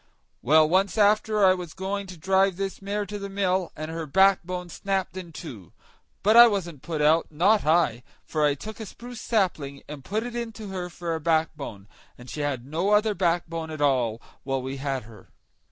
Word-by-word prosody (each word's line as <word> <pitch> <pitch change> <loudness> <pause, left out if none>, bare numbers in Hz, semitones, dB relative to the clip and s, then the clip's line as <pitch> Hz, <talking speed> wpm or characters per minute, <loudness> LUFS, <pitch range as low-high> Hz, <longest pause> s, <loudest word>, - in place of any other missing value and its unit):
Well, 155 +4 +5
once 190 +5 +1
after 215 +1 +3
that - - +7
I - - +6
was 180 -3 -7
going 195 +2 -3
to 185 -1 -10
drive 190 +2 +2
this 195 0 -4
mare 205 +1 -2
to 205 +1 -6
the 200 0 -6
mill, 190 -2 0
and 155 +1 -6
her 165 -1 -5
backbone 180 +1 +2
snapped 190 +1 -2
in 180 -3 -7
two; 120 - -10 0.5
but 215 +2 +4
I 240 0 +11
wasn't 175 - -3
put 155 -1 -2
out, 160 +2 +4
not 190 +7 +2
I; 155 -8 +3 0.2
for 155 -1 -1
I 145 -1 +3
took 215 - -9
a 220 - -6
spruce 240 +2 -10
sapling, 160 -11 -1
and 145 -2 -8
put 215 +8 -2
it 240 0 -6
into 225 -3 -5
her 180 -2 -4
for 175 -1 -4
a 160 - -2
backbone, 150 -10 -1 0.3
and 125 +1 -11
she - - -6
had 135 -4 -2
no 165 +8 -1
other 210 +1 +3
backbone 165 -3 -1
all 125 -6 +2
the - - -29 0.2
while 135 -1 -1
we 135 +1 -5
had 135 -2 -3
her. 110 -3 -15
175 Hz, 200 wpm, -26 LUFS, 150-200 Hz, 0.5 s, I